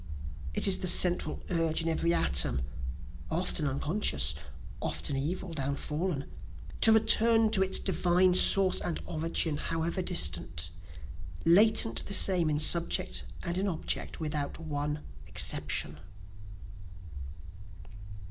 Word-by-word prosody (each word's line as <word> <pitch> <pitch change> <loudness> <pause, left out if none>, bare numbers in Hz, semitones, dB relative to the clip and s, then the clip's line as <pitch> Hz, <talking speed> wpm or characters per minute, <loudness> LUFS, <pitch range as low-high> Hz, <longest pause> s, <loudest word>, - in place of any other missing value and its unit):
"It - - +1
is 195 - +2
the 185 - -4
central 180 0 +3
urge 165 -2 -1
in - - -4
every 165 +1 -1
atom, 65 - +1 0.7
(Often 165 -2 -2
unconscious, 140 - 0 0.5
often 140 - -4
evil, 165 +6 -4
downfallen,) 140 +2 -4 0.6
To 225 - +8
return 225 0 +3
to 200 -4 +2
its 190 0 +3
divine 180 0 +1
source 185 +1 +4
and 170 - -3
origin, 160 -1 -3
however 165 +4 -3
distant, 80 - +1 0.7
Latent 215 +6 +4
the 200 - +1
same 180 -5 +4
in 150 - -1
subject 170 +2 +1 0.2
and 175 0 -3
in 200 - -2
object, 165 -5 -4
without 150 -3 -4
one 150 -1 -5 0.3
exception." 75 +1 -2
165 Hz, 110 wpm, -28 LUFS, 150-185 Hz, 0.7 s, To